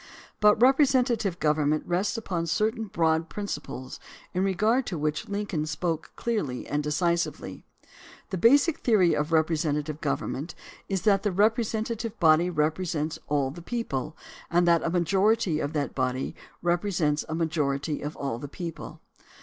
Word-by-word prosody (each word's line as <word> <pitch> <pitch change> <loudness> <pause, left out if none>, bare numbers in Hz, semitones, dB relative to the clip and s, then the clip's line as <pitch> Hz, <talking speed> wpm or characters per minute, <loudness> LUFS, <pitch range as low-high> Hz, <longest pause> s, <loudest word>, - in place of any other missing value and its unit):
But 210 0 +5
representative 250 - +3
government 150 0 +1
rests 185 +6 0
upon 175 -6 -3
certain 220 +6 0
broad 165 -4 +1
principles 150 -10 -6 0.3
in 185 0 0
regard 215 +7 +1
to 180 - -3
which 150 +3 -2
Lincoln 200 -7 -2
spoke 165 0 -3
clearly 205 - -2
and 145 +1 -1
decisively. 170 +3 -1 0.7
The 190 - -2
basic 285 - +4
theory 190 -8 +3
of 150 +2 -1
representative 155 -2 0
government 145 +2 -3 0.3
is 190 -2 -1
that 200 -3 +4
the 205 - 0
representative 225 +2 0
body 165 +1 +5
represents 155 -1 -1
all 140 -2 0
the 170 +4 -10
people, 160 - -4 0.3
and 175 +1 +3
that 170 -1 +5
a - - -1
majority 190 +1 +2
of 145 +1 -3
that 145 -2 -2
body 130 0 -2 0.3
represents 175 -4 +1
a 160 - -2
majority 150 -3 -1
of 150 +2 -5
all 135 -4 -3
the 145 - -6
people. 165 +3 -7
170 Hz, 140 wpm, -27 LUFS, 150-205 Hz, 0.7 s, But